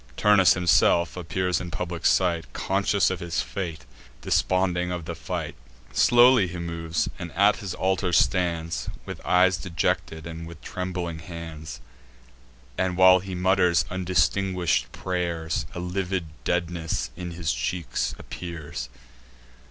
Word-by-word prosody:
Turnus 105 Hz, -3 st, +5 dB
himself 85 Hz, -1 st, +3 dB
appears 90 Hz, 0 st, -1 dB
in 90 Hz, -, -5 dB
public 85 Hz, 0 st, -2 dB
sight 85 Hz, -3 st, +1 dB
Conscious 100 Hz, 0 st, +1 dB
of 95 Hz, -, -3 dB
fate, 85 Hz, -1 st, -4 dB, 0.4 s
desponding 90 Hz, -1 st, +1 dB
of 90 Hz, -2 st, -4 dB
the 85 Hz, -, -4 dB
fight. -, -, -4 dB, 0.4 s
Slowly 120 Hz, -3 st, +6 dB
he 90 Hz, +1 st, -7 dB
moves, 85 Hz, -1 st, -2 dB
and 85 Hz, -1 st, -6 dB
at 100 Hz, +3 st, +4 dB
his 95 Hz, -3 st, -5 dB
altar 95 Hz, -1 st, 0 dB
stands 85 Hz, -1 st, +1 dB, 0.2 s
With -, -, -8 dB
eyes 90 Hz, 0 st, +4 dB
dejected, 80 Hz, -2 st, -2 dB
and 85 Hz, 0 st, -7 dB
with 85 Hz, -, -11 dB
trembling 90 Hz, -3 st, -4 dB
hands; 80 Hz, -2 st, -8 dB, 1.0 s
And, 90 Hz, -1 st, 0 dB
while 95 Hz, 0 st, +7 dB
he 95 Hz, 0 st, -6 dB
mutters 90 Hz, -3 st, +3 dB
undistinguish'd 90 Hz, 0 st, +1 dB
pray'rs, 85 Hz, -3 st, -2 dB
A -, -, -4 dB
livid 90 Hz, 0 st, -2 dB, 0.2 s
deadness 85 Hz, -2 st, -1 dB
in 90 Hz, -1 st, -6 dB
his 85 Hz, -5 st, -1 dB
cheeks 80 Hz, +7 st, -2 dB
appears. 75 Hz, -8 st, -7 dB
90 Hz, 125 wpm, -25 LUFS, 85-95 Hz, 1.0 s, while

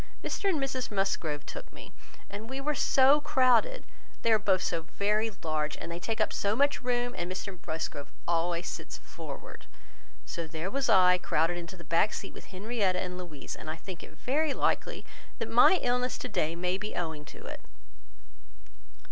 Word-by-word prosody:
Mr 400 Hz, -, 0 dB
and 330 Hz, -6 st, +2 dB
Mrs 270 Hz, -2 st, -2 dB
Musgrove 170 Hz, -7 st, -1 dB
took -, -, -8 dB
me, -, -, -11 dB, 0.4 s
and 210 Hz, +3 st, -7 dB
we 265 Hz, +1 st, -3 dB
were 300 Hz, +2 st, 0 dB
so 275 Hz, +1 st, +5 dB
crowded! 265 Hz, -, +3 dB, 0.4 s
They 230 Hz, -, +3 dB
are 215 Hz, -, +5 dB
both 190 Hz, -3 st, +2 dB
so 165 Hz, -1 st, 0 dB, 0.2 s
very 210 Hz, +2 st, +2 dB
large, 155 Hz, -2 st, -1 dB
and 170 Hz, +1 st, -6 dB
take 225 Hz, +3 st, -2 dB
up -, -, +2 dB
so 200 Hz, +1 st, +1 dB
much 285 Hz, +3 st, +3 dB
room; 245 Hz, -1 st, 0 dB
and 175 Hz, +1 st, -3 dB
Mr 185 Hz, 0 st, -5 dB
Musgrove 155 Hz, -2 st, -3 dB, 0.2 s
always 170 Hz, +1 st, +1 dB
sits -, -, -5 dB
forward. -, -, -9 dB, 0.6 s
So, 170 Hz, -1 st, -4 dB
there 160 Hz, +4 st, -4 dB
was 275 Hz, 0 st, 0 dB
I, 180 Hz, -1 st, +7 dB
crowded 165 Hz, +1 st, +1 dB
into 175 Hz, +2 st, -8 dB
the 170 Hz, -, -10 dB
back 170 Hz, +6 st, +2 dB
seat -, -, -6 dB
with -, -, -11 dB
Henrietta 195 Hz, -1 st, 0 dB
and 180 Hz, -1 st, -3 dB
Louisa; 175 Hz, -6 st, -7 dB
and 155 Hz, -, -7 dB
I 155 Hz, -, -2 dB
think 175 Hz, +2 st, -8 dB
it 155 Hz, -, -12 dB
very 290 Hz, +2 st, +1 dB
likely -, -, 0 dB, 0.3 s
that -, -, -3 dB
my 375 Hz, -, +7 dB
illness 250 Hz, +1 st, +1 dB
to -, -, -4 dB
day 165 Hz, -4 st, 0 dB
may 180 Hz, +2 st, 0 dB
be 210 Hz, +1 st, -4 dB
owing 160 Hz, -3 st, -3 dB
to -, -, -12 dB
it." -, -, -7 dB
190 Hz, 180 wpm, -30 LUFS, 170-245 Hz, 0.6 s, I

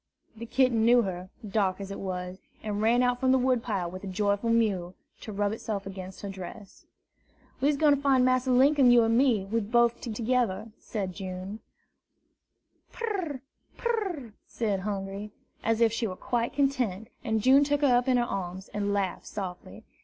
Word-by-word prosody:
The 230 Hz, +1 st, -8 dB
kitten 250 Hz, -3 st, +2 dB
knew 240 Hz, +1 st, +5 dB
her, 185 Hz, -1 st, -5 dB, 0.2 s
dark 195 Hz, -2 st, 0 dB
as 195 Hz, 0 st, -6 dB
it 195 Hz, -, -6 dB
was, 180 Hz, -1 st, -5 dB, 0.2 s
and 210 Hz, -1 st, -2 dB
ran 235 Hz, +3 st, +4 dB
out 245 Hz, 0 st, +1 dB
from 260 Hz, 0 st, +3 dB
the 265 Hz, -, +5 dB
wood 255 Hz, -2 st, +2 dB
pile 200 Hz, -7 st, -2 dB
with 185 Hz, +1 st, -8 dB
a -, -, -5 dB
joyful 200 Hz, +3 st, 0 dB
mew, 200 Hz, -6 st, +1 dB, 0.2 s
to 215 Hz, -, -8 dB
rub 205 Hz, 0 st, 0 dB
itself 215 Hz, -2 st, -4 dB
against 190 Hz, -1 st, -8 dB
her 200 Hz, -, -5 dB
dress. 195 Hz, +2 st, -10 dB, 0.7 s
"We's 285 Hz, +2 st, +2 dB
gwine 295 Hz, -1 st, +5 dB
to 280 Hz, -, -6 dB
fine 265 Hz, -3 st, +4 dB
Massa 255 Hz, 0 st, +2 dB
Linkum, 270 Hz, +1 st, +5 dB
you 240 Hz, -1 st, +7 dB
an' 225 Hz, 0 st, +2 dB
me, 240 Hz, -6 st, +3 dB
bof 230 Hz, +3 st, +1 dB
two 240 Hz, -, -5 dB
togeder," 225 Hz, -2 st, 0 dB
said 195 Hz, -4 st, -4 dB
June. 190 Hz, +2 st, -6 dB, 1.3 s
"Pur! 370 Hz, -, -3 dB, 0.4 s
pur 470 Hz, -2 st, 0 dB
r -, -, -2 dB, 0.2 s
r!" 225 Hz, -3 st, -13 dB
said 210 Hz, -4 st, -1 dB
Hungry, 195 Hz, +1 st, -4 dB, 0.3 s
as 225 Hz, 0 st, +1 dB
if 225 Hz, -1 st, +4 dB
she 230 Hz, 0 st, -1 dB
were 185 Hz, -, -5 dB
quite 235 Hz, +4 st, -1 dB
content; 255 Hz, -8 st, 0 dB
and 220 Hz, 0 st, 0 dB
June 270 Hz, +2 st, +6 dB
took 290 Hz, 0 st, 0 dB
her 270 Hz, -4 st, +5 dB
up 245 Hz, +1 st, +2 dB
in 255 Hz, -1 st, +4 dB
her 240 Hz, -, +3 dB
arms, 190 Hz, -3 st, -5 dB
and 205 Hz, -1 st, -2 dB
laughed 195 Hz, -2 st, -2 dB
softly. 185 Hz, -4 st, -7 dB
225 Hz, 185 wpm, -28 LUFS, 195-250 Hz, 1.3 s, you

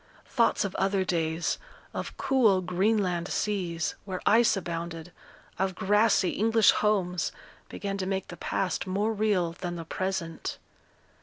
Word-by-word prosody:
Thoughts 230 Hz, -3 st, +2 dB
of 195 Hz, -, -3 dB
other 195 Hz, 0 st, +1 dB
days, 165 Hz, -1 st, -1 dB, 0.3 s
of -, -, -5 dB
cool 225 Hz, -8 st, +3 dB
Greenland 185 Hz, -1 st, +1 dB
seas, 180 Hz, -7 st, -1 dB
where 185 Hz, -2 st, -4 dB
ice 225 Hz, -1 st, +5 dB
abounded, 170 Hz, -1 st, -5 dB, 0.5 s
of 190 Hz, -1 st, 0 dB
grassy 205 Hz, -1 st, +3 dB
English 225 Hz, +1 st, +4 dB
homes, 190 Hz, -4 st, +1 dB, 0.4 s
began 200 Hz, -1 st, -4 dB
to 185 Hz, -, -2 dB
make 190 Hz, -1 st, -2 dB
the 175 Hz, -, -7 dB
past 185 Hz, +3 st, -2 dB
more 205 Hz, +4 st, 0 dB
real 205 Hz, -5 st, +1 dB
than 175 Hz, +1 st, -5 dB
the 165 Hz, -1 st, -6 dB
present. 185 Hz, -2 st, -3 dB
190 Hz, 135 wpm, -28 LUFS, 175-205 Hz, 0.5 s, ice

